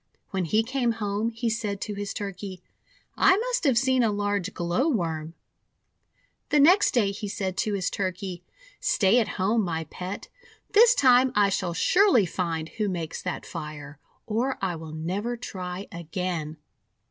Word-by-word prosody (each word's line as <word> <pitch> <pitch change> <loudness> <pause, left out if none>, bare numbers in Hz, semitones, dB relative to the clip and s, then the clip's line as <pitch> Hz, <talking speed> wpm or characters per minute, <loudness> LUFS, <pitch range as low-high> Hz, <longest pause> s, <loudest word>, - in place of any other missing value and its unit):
When 190 -2 -1
he 215 +7 +2
came 245 -1 0
home 210 0 -1
he 230 +1 -3
said 220 -3 -2
to 210 - -3
his 205 0 -4
Turkey: 195 -2 -6 0.3
— - - -34
:'I 375 - +5
must - - -1
have 265 -5 +4
seen 260 +1 +3
a 225 -3 +3
large 205 -2 -1
Glow 175 - 0
worm!' 165 - -2 1.1
The 295 - +4
next 350 +3 +5
day 210 -5 +3
he 205 +1 -5
said 195 -2 -3
to 215 - 0
his 185 -2 -1
Turkey: 185 -2 -4 0.2
— - - -25
"Stay 245 - +3
at 225 - +1
home, 210 +4 +2
my 165 -4 -2
Pet. 185 +2 -6 0.4
This 465 +4 +7
time 255 - +5
I 205 -1 +4
shall 175 -3 -1
surely 360 - +4
find 165 -2 -3
who 215 -2 -2
makes 170 -3 -4
that 180 -2 -4
fire, 145 -1 -8 0.3
or 240 +5 -1
I 185 -3 -1
will 160 -1 -8
never 190 +10 -3
try 185 -4 -6
again!' 170 -2 -4
200 Hz, 170 wpm, -26 LUFS, 180-235 Hz, 1.1 s, This